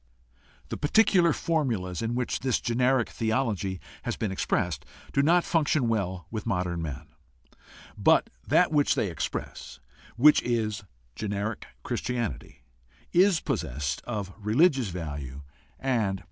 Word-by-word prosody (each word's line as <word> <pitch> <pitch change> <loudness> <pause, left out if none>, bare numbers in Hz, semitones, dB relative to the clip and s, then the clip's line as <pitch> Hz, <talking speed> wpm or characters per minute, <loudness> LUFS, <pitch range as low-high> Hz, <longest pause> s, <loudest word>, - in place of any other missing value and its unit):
The - - -4
particular 175 +1 +4
formulas 120 - -1
in 115 +1 -1
which 125 -1 -1
this 130 -2 +1
generic 125 +1 +2
theology 110 -5 -1 0.2
has - - -3
been 110 -4 -2
expressed 90 -5 -1 0.3
do 140 - +4
not 170 +4 +4
function 155 -5 +1
well 95 -6 -1
with 110 -2 -4
modern 90 -2 -1
men, 75 -4 -5 0.9
but - - +4 0.2
that - - +4
which 145 -2 +3
they 100 - 0
express 75 -2 -5 0.2
— - - -24
which 150 - +8
is 115 -2 -1 0.3
generic 100 - -3 0.2
Christianity 120 - -3 0.3
— - - -31 0.2
is 185 -6 +1
possessed 70 +3 -2
of 105 -5 -4
religious 130 - +3
value 75 -6 -6 0.4
and 115 -7 0
power. - - -13
110 Hz, 130 wpm, -27 LUFS, 90-130 Hz, 0.9 s, which